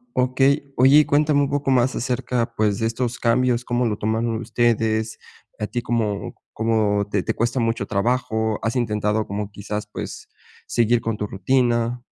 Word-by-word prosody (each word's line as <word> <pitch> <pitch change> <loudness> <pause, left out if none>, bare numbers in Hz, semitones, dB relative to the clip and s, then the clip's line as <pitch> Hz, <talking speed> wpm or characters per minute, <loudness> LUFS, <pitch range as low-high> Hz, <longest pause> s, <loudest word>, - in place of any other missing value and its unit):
Okey. 135 +2 +1
Oye, 140 +4 +6
cuéntame 145 0 +3
un 140 - 0
poco 145 -1 -1
más 130 0 +2
acerca, 125 -1 -2
pues, 105 -2 +1
de 115 - +1
estos 120 +1 -3
cambios. 120 +1 +2
¿Cómo 120 0 0
lo 105 -3 -1
tomaron 110 +2 -1
ustedes? 110 -1 0 0.4
¿A 105 - -2
ti 120 - -3
cómo 110 -4 -2 0.2
cómo 110 -2 +1
te 100 -2 0
te - - -1
cuesta 120 +3 0
mucho 115 0 0
trabajo? 110 0 0
¿Has 115 +2 -1
intentado, 105 -3 0
como 100 +1 -4
quizás, 105 +1 -5
pues, - - -7 0.4
seguir 120 0 +2
con 115 -1 -2
tu 105 - -3
rutina? 120 +3 0
115 Hz, 165 wpm, -22 LUFS, 110-125 Hz, 0.4 s, Oye